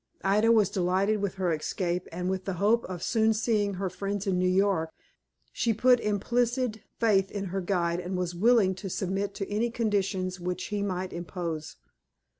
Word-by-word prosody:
Ida 210 Hz, +4 st, +4 dB
was 215 Hz, -4 st, +4 dB
delighted 195 Hz, +3 st, +1 dB
with 200 Hz, -2 st, -2 dB
her 185 Hz, -3 st, 0 dB
escape, 175 Hz, +3 st, -2 dB
and, 180 Hz, +2 st, -3 dB
with 190 Hz, 0 st, -2 dB
the 195 Hz, -, -2 dB
hope 215 Hz, +6 st, +2 dB
of 180 Hz, -2 st, -6 dB
soon 220 Hz, -1 st, +2 dB
seeing 210 Hz, -3 st, +1 dB
her 190 Hz, +1 st, -2 dB
friends 200 Hz, +2 st, -3 dB
in 190 Hz, -2 st, +1 dB
New 185 Hz, 0 st, +2 dB
York, 185 Hz, -3 st, +2 dB, 0.6 s
She 230 Hz, -2 st, +1 dB
put 250 Hz, +2 st, +5 dB
implicit 240 Hz, +2 st, 0 dB, 0.2 s
faith 195 Hz, -4 st, +3 dB
in 200 Hz, -1 st, -4 dB
her 195 Hz, -, -1 dB
guide, 175 Hz, -2 st, 0 dB
and 180 Hz, +1 st, -3 dB
was 180 Hz, -1 st, -2 dB
willing 205 Hz, +1 st, +4 dB
to 195 Hz, -, -4 dB
submit 195 Hz, +2 st, -2 dB
to 195 Hz, -, -4 dB
any 215 Hz, +3 st, 0 dB
conditions 195 Hz, -5 st, -1 dB
which 180 Hz, +1 st, -4 dB
he 205 Hz, -1 st, -2 dB
might 185 Hz, -2 st, -3 dB
impose. 170 Hz, -2 st, -5 dB
195 Hz, 180 wpm, -28 LUFS, 180-210 Hz, 0.6 s, put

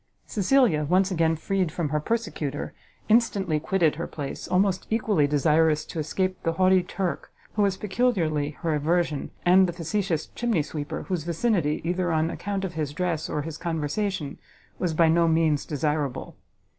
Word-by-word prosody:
Cecilia, 210 Hz, -, +2 dB
once 185 Hz, +5 st, +2 dB
again 165 Hz, -2 st, +2 dB
freed 185 Hz, +1 st, -1 dB
from 160 Hz, -2 st, -2 dB
her 150 Hz, +1 st, 0 dB
persecutor, 155 Hz, -7 st, -3 dB, 0.3 s
instantly 200 Hz, -8 st, +2 dB
quitted 165 Hz, -2 st, +1 dB
her 170 Hz, -, -3 dB
place, 140 Hz, -3 st, -6 dB
almost 185 Hz, 0 st, +1 dB
equally 210 Hz, -9 st, +2 dB
desirous 150 Hz, +1 st, +2 dB
to 165 Hz, -, -6 dB
escape 185 Hz, +4 st, -1 dB
the 165 Hz, -, 0 dB
haughty 185 Hz, +1 st, +4 dB
Turk, 180 Hz, 0 st, -4 dB, 0.2 s
who 210 Hz, -, 0 dB
was 195 Hz, -2 st, +2 dB
peculiarly 190 Hz, -10 st, 0 dB
her 165 Hz, -2 st, +1 dB
aversion, 155 Hz, 0 st, 0 dB, 0.2 s
and 185 Hz, +1 st, +6 dB
the 175 Hz, -, -3 dB
facetious 175 Hz, -1 st, -1 dB
chimney 230 Hz, -10 st, 0 dB
sweeper, 145 Hz, -1 st, -5 dB
whose 180 Hz, -5 st, -3 dB
vicinity, 170 Hz, -2 st, 0 dB
either 175 Hz, +1 st, 0 dB
on 160 Hz, +1 st, +1 dB
account 195 Hz, -1 st, -3 dB
of 180 Hz, -, -5 dB
his 150 Hz, -3 st, -3 dB
dress 165 Hz, -1 st, -2 dB
or 150 Hz, -, -2 dB
his 155 Hz, 0 st, -7 dB
conversation, 165 Hz, 0 st, -2 dB, 0.4 s
was 170 Hz, -3 st, -1 dB
by 165 Hz, 0 st, +5 dB
no 165 Hz, +1 st, +4 dB
means 160 Hz, -2 st, +2 dB
desirable. 150 Hz, -2 st, -2 dB
170 Hz, 160 wpm, -25 LUFS, 155-190 Hz, 0.4 s, and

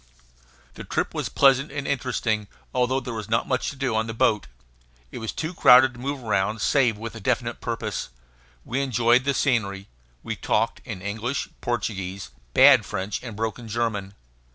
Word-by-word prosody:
The -, -, -9 dB
trip -, -, -2 dB
was -, -, -3 dB
pleasant 135 Hz, +1 st, +4 dB
and 140 Hz, -1 st, -4 dB
interesting, 110 Hz, -5 st, -1 dB, 0.3 s
although 125 Hz, +1 st, +1 dB
there 125 Hz, -2 st, -6 dB
was 110 Hz, -2 st, -6 dB
not 115 Hz, +1 st, +1 dB
much 130 Hz, -, 0 dB
to -, -, -8 dB
do 135 Hz, -4 st, -1 dB
on 110 Hz, +1 st, 0 dB
the 115 Hz, -, -5 dB
boat. 115 Hz, -, +2 dB, 0.6 s
It 125 Hz, -, -7 dB
was 115 Hz, -1 st, -3 dB
too 160 Hz, +2 st, -4 dB
crowded 130 Hz, -5 st, +7 dB
to 120 Hz, -, -13 dB
move 135 Hz, 0 st, -4 dB
around 105 Hz, 0 st, 0 dB
save 120 Hz, -1 st, +2 dB
with 115 Hz, +1 st, -6 dB
a 115 Hz, -, -8 dB
definite 95 Hz, -, -1 dB
purpose. -, -, -3 dB, 0.6 s
We 130 Hz, +4 st, -1 dB
enjoyed 120 Hz, -1 st, +3 dB
the 140 Hz, -1 st, +1 dB
scenery; 100 Hz, -7 st, 0 dB, 0.3 s
we -, -, -3 dB
talked -, -, 0 dB
in 90 Hz, -, -7 dB
English, 110 Hz, +6 st, -3 dB
Portuguese, 95 Hz, -, -3 dB, 0.2 s
bad -, -, +8 dB
French, 95 Hz, +2 st, -4 dB
and 115 Hz, -4 st, -7 dB
broken 115 Hz, +2 st, -4 dB
German. 105 Hz, -3 st, -2 dB
115 Hz, 175 wpm, -24 LUFS, 105-130 Hz, 0.6 s, bad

